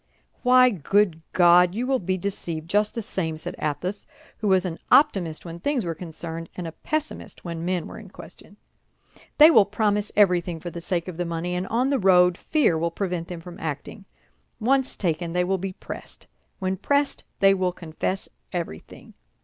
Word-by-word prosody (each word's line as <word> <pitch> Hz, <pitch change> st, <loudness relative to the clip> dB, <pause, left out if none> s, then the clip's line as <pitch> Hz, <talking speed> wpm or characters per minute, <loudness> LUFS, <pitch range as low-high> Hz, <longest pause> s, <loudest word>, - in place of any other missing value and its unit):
"Why, 255 Hz, 0 st, +6 dB
good 190 Hz, -1 st, +1 dB
God! 180 Hz, 0 st, +5 dB
you 240 Hz, +3 st, -1 dB
will 260 Hz, 0 st, +1 dB
be 185 Hz, 0 st, -1 dB
deceived 170 Hz, -4 st, -4 dB
just 210 Hz, +3 st, +1 dB
the 230 Hz, -, -3 dB
same," 160 Hz, -5 st, -3 dB
said 155 Hz, -, -5 dB
Athos, 165 Hz, +7 st, -3 dB, 0.3 s
who 215 Hz, -, -2 dB
was 190 Hz, -1 st, +3 dB
an 170 Hz, -2 st, -4 dB
optimist 180 Hz, -, +3 dB
when 170 Hz, 0 st, -7 dB
things 260 Hz, +1 st, -1 dB
were 165 Hz, -, -2 dB
concerned, 165 Hz, 0 st, -7 dB
and 180 Hz, -, -4 dB
a 165 Hz, -, -5 dB
pessimist 310 Hz, -, -5 dB
when 165 Hz, -1 st, -5 dB
men 180 Hz, -1 st, -1 dB
were -, -, -9 dB
in -, -, -12 dB
question. -, -, -13 dB, 0.8 s
"They 310 Hz, +2 st, +9 dB
will 220 Hz, -9 st, +7 dB
promise 210 Hz, 0 st, 0 dB
everything 180 Hz, -4 st, +3 dB
for 175 Hz, +2 st, -6 dB
the 170 Hz, -, -7 dB
sake 170 Hz, 0 st, -2 dB
of 180 Hz, -3 st, -6 dB
the 175 Hz, -, -1 dB
money, 170 Hz, +1 st, -3 dB
and 180 Hz, +1 st, -2 dB
on 250 Hz, +4 st, +1 dB
the 275 Hz, -, +2 dB
road 180 Hz, -2 st, +5 dB
fear 260 Hz, -, +1 dB
will 170 Hz, +1 st, 0 dB
prevent 175 Hz, -1 st, -3 dB
them 175 Hz, -2 st, -7 dB
from 175 Hz, 0 st, -11 dB
acting. 160 Hz, +6 st, -6 dB, 0.5 s
Once 265 Hz, +3 st, +1 dB
taken, 170 Hz, -2 st, -2 dB
they 180 Hz, 0 st, +2 dB
will 190 Hz, +1 st, 0 dB
be 190 Hz, +1 st, -4 dB
pressed; -, -, -9 dB, 0.3 s
when 190 Hz, -1 st, -2 dB
pressed, 285 Hz, +7 st, 0 dB
they 195 Hz, 0 st, +6 dB
will 185 Hz, -1 st, 0 dB
confess 175 Hz, +2 st, -4 dB, 0.2 s
everything. 170 Hz, -, -7 dB
180 Hz, 185 wpm, -24 LUFS, 170-205 Hz, 0.8 s, They